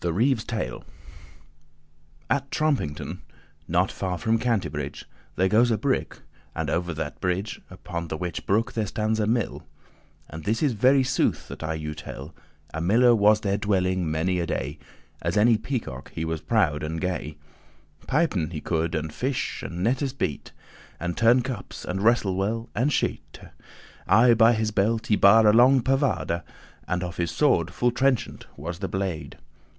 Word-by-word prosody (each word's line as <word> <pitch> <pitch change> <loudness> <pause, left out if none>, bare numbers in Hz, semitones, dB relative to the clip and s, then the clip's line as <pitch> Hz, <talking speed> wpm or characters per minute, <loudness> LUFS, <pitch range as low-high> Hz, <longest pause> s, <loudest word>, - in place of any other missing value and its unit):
THE 110 +8 +1
TALE.<1> 115 -3 -4 1.4
At 140 0 0
Trompington, 135 - -1 0.5
not 90 +3 +1
far 90 -2 -3
from 115 +3 +1
Cantebrig,* 115 -4 +1 0.3
*Cambridge - - -10 0.3
There 95 - +2
goes 115 +5 +4
a 110 - +2
brook, 130 +5 -2 0.3
and - - -2
over 85 0 -1
that 80 -1 -4
a - - -31
brig, 95 +3 -2
Upon 85 -2 -6
the 80 - -4
whiche 90 0 -4
brook 115 +5 +1
there 110 -2 -1
stands 110 +2 -1
a 105 - +1
mill: 115 -1 -1 0.6
And 80 +1 -9
this 110 +7 0
is 145 - +3
*very 130 +5 +4
sooth* 130 - 0
that - - -8
I 80 0 -2
you 75 -1 -4
tell. 75 -2 -8
*complete - - -21
truth* - - -28 0.3
A 80 - -3
miller 115 +7 +5
was 105 0 +4
there 100 -1 0
dwelling 95 -4 0
many 85 +4 0
a 85 - -2
day, 75 +2 -3 0.4
As - - -1
any 115 +2 +5
peacock 110 - -5
he 80 - -2
was 80 -1 -3
proud 90 -10 +1
and 80 +1 -3
gay: 80 -4 -3 0.7
Pipen 135 - +1
he 80 - -3
could, 80 +1 -1
and 80 0 -3
fish, 130 +1 -2
and 85 +1 -5
nettes 130 +4 0
bete*, 75 - -3
*prepare - - -14
And 85 - -2
turne 120 +2 +4
cups, 125 -6 -6
and 95 +2 -3
wrestle 110 -4 +3
well, 110 +4 -2
and 130 +5 +1
shete*. - - 0 0.2
*shoot - - -13 0.6
Aye 115 +4 +6
by 115 +1 +5
his 110 -1 0
belt 110 +3 +1
he 105 - +3
bare 110 +3 +6
a 105 - +6
long 125 +4 +6
pavade*, 135 - +1
*poniard 85 +1 -1 0.5
And 90 0 -1
of 90 0 -6
his 85 -1 0
sword 90 - +2
full 120 +6 +1
trenchant 130 0 0
was 85 +4 -6
the 95 - -3
blade. 95 -5 -4
100 Hz, 180 wpm, -25 LUFS, 85-115 Hz, 1.4 s, Aye